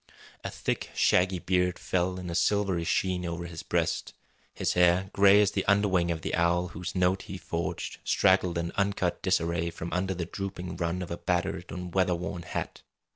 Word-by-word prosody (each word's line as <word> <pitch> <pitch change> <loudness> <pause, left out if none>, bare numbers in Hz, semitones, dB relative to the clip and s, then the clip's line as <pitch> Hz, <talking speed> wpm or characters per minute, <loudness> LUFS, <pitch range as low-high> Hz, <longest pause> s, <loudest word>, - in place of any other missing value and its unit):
A - - -3
thick, - - -3
shaggy 90 +1 +3
beard 90 0 +1
fell 90 0 -1
in 90 -2 -5
a - - -3
silvery 95 -1 +1
sheen 90 +1 0
over 85 0 -4
his 85 -1 -7
breast. - - -1 0.4
His - - -1
hair, 90 +2 +3
gray 100 +1 +6
as 100 - +1
the - - -1
underwing 100 -4 +3
of 80 -1 -2
the - - -3
owl 85 +1 +2
whose 90 +3 -6
note 90 +1 +2
he 95 - -5
forged, 85 -2 -4
straggled 90 -1 +3
in 85 0 -2
uncut 100 0 0
disarray 85 0 +1
from 85 0 -6
under 95 +1 0
the 85 -1 -3
drooping 90 -1 -5
rim 85 +1 -1
of 90 - -8
a 85 - -3
battered 90 0 -2
and 90 -1 -6
weatherworn 90 -1 0
hat. - - -5
90 Hz, 180 wpm, -28 LUFS, 85-95 Hz, 0.4 s, gray